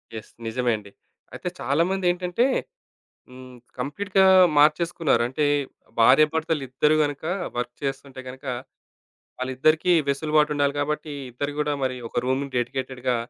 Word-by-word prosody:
Yes. 110 - -9 0.2
నిజమే 120 +1 0
అండి. 100 -1 -13 0.4
అయితే 180 - -4
చాలామందేంటంటే 180 - +1 0.8
హ్మ్, 125 0 -12 0.2
కంప్లీట్‌గా 190 +9 +1 0.3
మార్చేసుకున్నారు. 155 +1 +3
అంటే, 130 +4 -2 0.6
భార్యాభర్తలిద్దరూ 150 +2 +3
గనక 145 0 -2 0.3
వర్క్ 120 0 -2
చేస్తుంటే 135 -1 -5
గనక, 130 +1 -10 1.0
వాళ్ళిద్దరికీ 155 +7 +2 0.2
వెసులుబాటుండాలి 150 0 +1
కాబట్టీ, 150 +1 -2 0.2
ఇద్దరు 145 +4 -4
గూడా 150 0 0
మరి 130 -1 -1
ఒక 120 - -2
రూమ్‌ని 130 +2 -1
డెడికేటెడ్‌గా 125 0 -2
140 Hz, 105 wpm, -24 LUFS, 130-155 Hz, 1.0 s, మార్చేసుకున్నారు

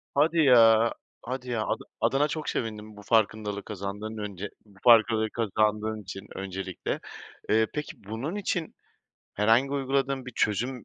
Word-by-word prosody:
Hadi 160 +4 +3
ya 115 -5 +6 0.3
hadi 125 +1 -5
ya, 115 -2 -1
ada - - -2 0.2
adına 145 +2 +3
çok 155 0 -4
sevindim 110 -2 -4
bu 105 - -10
farkındalığı 105 -2 +1
kazandığın 105 +2 -6
önce 105 -1 -5 0.2
bu 100 -2 -21
farklılığı 110 -2 +5
kazandığın 110 0 0
için 95 0 -9
öncelikle. 95 -1 -4 0.5
Eee, 110 0 +4
peki, 150 -8 -6
bunun 115 - -4
için 180 -5 -2 0.6
herhangi 115 +6 +3
uyguladığın 135 -1 -1
bir 125 - -7
çözüm 120 +4 -1
110 Hz, 140 wpm, -27 LUFS, 105-130 Hz, 0.6 s, ya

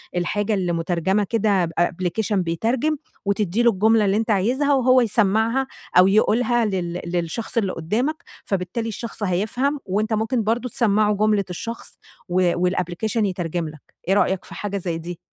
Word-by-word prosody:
الحاجة 205 +5 0
اللي 185 -4 0
مترجمة 175 +4 0
كده 200 -3 +1
بapplication 175 +5 -1
بيترجم، 225 - 0 0.3
وتدّي 200 +2 0
له 235 - +6
الجملة 220 +2 +3
اللي 195 +1 +2
أنتَ 225 +1 0
عايزها، 250 +9 +2
وهو 255 -1 +4
يسمّعها 225 +3 +2 0.3
أو 180 +1 +8
يقولها 230 +4 +3
لل 180 -4 -2
للشخص 175 +7 -3
اللي 200 -5 +1
قدّامك، 245 - -2 0.2
فبالتالي 195 +4 -2
الشخص 225 0 -6
هيفهم، 220 +10 0
وأنتَ 210 +3 -1
ممكن 225 +2 0
برضو 235 +4 -1
تسمّعه 215 -4 +2
جملة 210 -1 +2
الشخص 230 +6 -6 0.3
و 180 -1 +2 0.2
والapplication 185 +5 -2
يترجم 175 -3 -2
لك، 150 -2 -13 0.3
إيه 190 - +3
رأيك 190 -2 +1
في - - -11
حاجة 200 -1 -3
زي 175 -3 -3
دي؟ 170 +1 -7
205 Hz, 155 wpm, -22 LUFS, 180-230 Hz, 0.3 s, أو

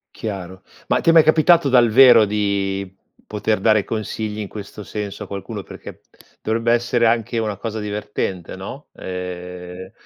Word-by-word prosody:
Chiaro. 95 -4 -6 0.3
Ma - - +2
ti - - +2
è - - +8
mai 165 -1 +7
capitato 155 0 +4
dal 120 -2 +5
vero 120 -1 +7
di 100 -1 -1 0.4
poter 105 0 -1
dare 110 0 +3
consigli 110 -1 -4
in 105 - -5
questo 105 +1 -9
senso 105 -1 -6
a - - -10
qualcuno? 100 -2 -6
Perché - - -11 0.4
dovrebbe 115 +1 0
essere 120 0 +2
anche 115 +1 0
una 105 -3 -2
cosa 110 +1 -5
divertente, 105 -4 -4
no? 105 +10 -9
Ehm 90 0 -7
105 Hz, 155 wpm, -20 LUFS, 95-115 Hz, 0.4 s, è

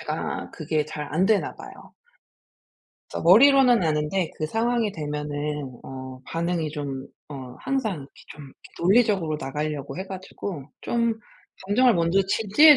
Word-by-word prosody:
제가 - - -4
그게 155 -1 -1
잘 150 -1 -6
안 185 +4 +3
되나 215 -1 +2
봐요. - - -12 1.2
그래서 - - -4
머리로는 250 +4 +7
아는데 155 +2 0
그 155 - -2
상황이 225 +3 +1
되면은 150 -3 -4
어 130 -1 -8
반응이 165 -1 -1
좀 140 -3 -5 0.2
어 130 -3 -8
항상 265 -6 -1
이렇게 140 -4 -10 0.2
좀 150 - -11
이렇게 135 - -14 0.3
논리적으로 190 -5 +3
나가려고 150 0 -3
해 190 - -4
가지고 185 -5 -6 0.2
좀 235 -1 +1 0.5
감정을 240 +4 +4
먼저 170 +2 +3
지지해 250 +10 +7
165 Hz, 300 characters per minute, -25 LUFS, 150-210 Hz, 1.2 s, 머리로는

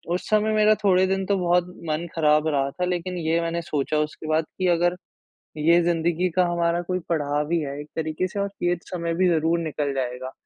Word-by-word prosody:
उस 180 - -5
समय 215 0 +2
मेरा 215 0 +5
थोड़े 190 -1 +4
दिन 195 0 -1
तो 200 -1 +2
बहुत 175 0 +2 0.2
मन 155 +3 -1
ख़राब 155 -1 +3
रहा 140 -2 +1
था, 180 +4 -2
लेकिन 180 0 -2
ये 165 0 0
मैंने 170 0 -2
सोचा 150 -1 -1
उसके 150 +1 -4
बाद 155 0 +1
कि 185 - +1
अगर 175 0 +2 0.6
ये 170 +3 +4
ज़िंदगी 170 +1 +1
का 180 - +5
हमारा 170 0 +1
कोई 185 +1 -2
पढ़ाव 150 -1 -1
ही 170 - +2
है 140 0 -5
एक 150 - -11
तरीक़े 160 +3 -1
से 195 +3 -6
और 200 0 -1
ये 175 0 +2
समय 170 -2 -3
भी 185 +2 +3
ज़रूर 165 0 +2
निकल 150 -3 -2
जाएगा। 130 0 -3
170 Hz, 210 wpm, -24 LUFS, 155-180 Hz, 0.6 s, मेरा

